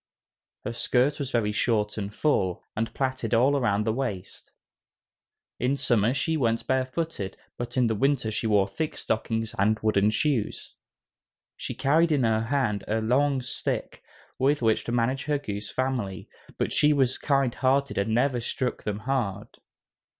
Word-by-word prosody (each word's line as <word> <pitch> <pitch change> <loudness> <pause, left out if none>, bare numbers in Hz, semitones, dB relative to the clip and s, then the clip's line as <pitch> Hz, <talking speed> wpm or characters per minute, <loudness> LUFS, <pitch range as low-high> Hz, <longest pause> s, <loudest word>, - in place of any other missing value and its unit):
Her 120 - -3
skirt 130 +5 +1
was 140 -3 -3
very 115 -4 +1
short 105 -1 0
and 100 -2 -4
full, 100 - 0
and 115 +1 -1
plaited 130 -5 -1
all 130 +5 +4
around 105 -6 +1
the 110 0 0
waist. 110 -7 -5 1.1
In 130 +3 +1
summer 120 -1 +2
she 160 +2 0
went 115 -4 0
barefooted, 130 - -2 0.2
but 120 +1 -5
in 125 - +4
winter 135 -5 +1
she 110 - -2
wore 100 -2 +3
thick 150 +11 -4
stockings 110 0 -2
and 110 +2 +3
wooden 105 -1 +3
shoes. 120 0 -1 0.8
She - - -6
carried 155 +5 +3
in 145 -4 +2
her 110 -1 +2
hand 115 -4 0
a 110 +1 0
long 130 +4 +2
stick, 120 - -4 0.4
with 140 0 +2
which 110 -1 +2
to - - -3
manage 120 +3 0
her 150 0 +1
goose 105 -6 -5
family, 125 -8 -2 0.3
but - - -1
she 150 0 +4
was 130 -3 +1
kind 135 -4 +1
hearted 135 -3 +1
and 100 +2 0
never 125 +2 +2
struck 125 +2 -2
them 105 0 -4
hard. 115 -5 -2
120 Hz, 155 wpm, -26 LUFS, 110-135 Hz, 1.1 s, all